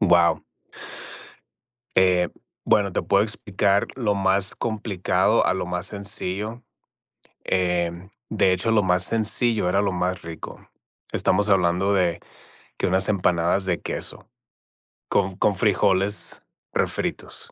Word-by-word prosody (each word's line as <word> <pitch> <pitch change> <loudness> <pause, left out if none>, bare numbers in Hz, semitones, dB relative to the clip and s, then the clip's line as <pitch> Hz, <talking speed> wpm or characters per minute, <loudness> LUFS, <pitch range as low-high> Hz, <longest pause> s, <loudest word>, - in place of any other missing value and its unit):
Guau. 85 -4 +4 1.6
Eh, 90 -1 +4 0.4
bueno, 100 -2 +2
te - - -1
puedo 100 +1 +3
explicar 100 -2 0
lo 105 -5 +1
más 95 0 +1
complicado, 105 -5 +1
a - - +2
lo 95 -1 -3
más 90 +1 -3
sencillo. 100 +3 -5 0.8
Eh, 90 -1 0 0.2
de 100 -4 +3
hecho, 95 +5 0
lo 110 -2 +4
más 90 -1 +2
sencillo 110 -1 0
era 100 +2 +2
lo 100 -2 0
más 90 +1 -2
rico. 85 -1 -9 0.4
Estamos 105 +2 +1
hablando 95 +1 +3
de 90 -4 +1 0.6
que - - 0
unas 95 +2 +1
empanadas 90 -1 +1
de 90 -2 -1
queso - - -7 0.8
con 95 0 +1
con 105 - +2
frijoles 100 -1 0 0.3
refritos. - - -3
95 Hz, 120 wpm, -24 LUFS, 90-105 Hz, 1.6 s, Guau